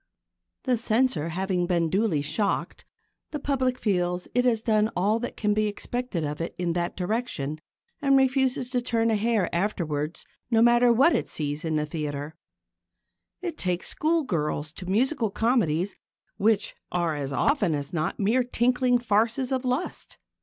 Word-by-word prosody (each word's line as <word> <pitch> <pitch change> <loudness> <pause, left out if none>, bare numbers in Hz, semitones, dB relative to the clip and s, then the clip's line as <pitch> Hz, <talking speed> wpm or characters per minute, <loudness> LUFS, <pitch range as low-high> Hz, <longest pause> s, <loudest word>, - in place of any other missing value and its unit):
The 255 -2 +1
Censor 225 - +1
having 180 +1 -1
been 170 -2 +1
duly 190 -7 +1
shocked, 160 +8 -2 0.4
the 300 - -4
public 260 -3 0
feels 180 -5 0
that - - -17
it 250 - +2
has 225 -3 +2
done 215 -2 +2
all 205 +5 +2
that 240 - -5
can 210 -1 +1
be 215 0 +1
expected 225 -3 -3
of 150 +1 -3
it 165 - -4
in 175 -1 -1
that 175 0 -2
direction 180 - -2 0.4
and 275 -1 +4
it - - +7
refuses 265 -1 +1
to 250 -2 +1
turn 230 -2 +1
a - - +3
hair 215 -3 +1
afterwards 170 -5 -2 0.2
no 225 -2 +3
matter 240 +1 +5
what 270 +9 +5
it - - -1
sees 145 0 -3
in 160 -1 -1
the 150 0 +1
theatre. 150 -1 -4 1.1
It 345 -3 -4
takes 180 -1 -1
schoolgirls 170 - -1
to 180 - -9
musical 230 +4 +1
comedies 195 -6 +1 0.4
which 215 0 +1 0.2
are 170 -2 0
as 140 -2 -3
often 180 - +2
as 140 +2 -5
not 160 0 -2
mere 225 +5 +2
tinkling 245 +1 +2
farces 235 +3 +1
of 260 -1 0
lust. 255 +7 -3
210 Hz, 165 wpm, -26 LUFS, 170-245 Hz, 1.1 s, it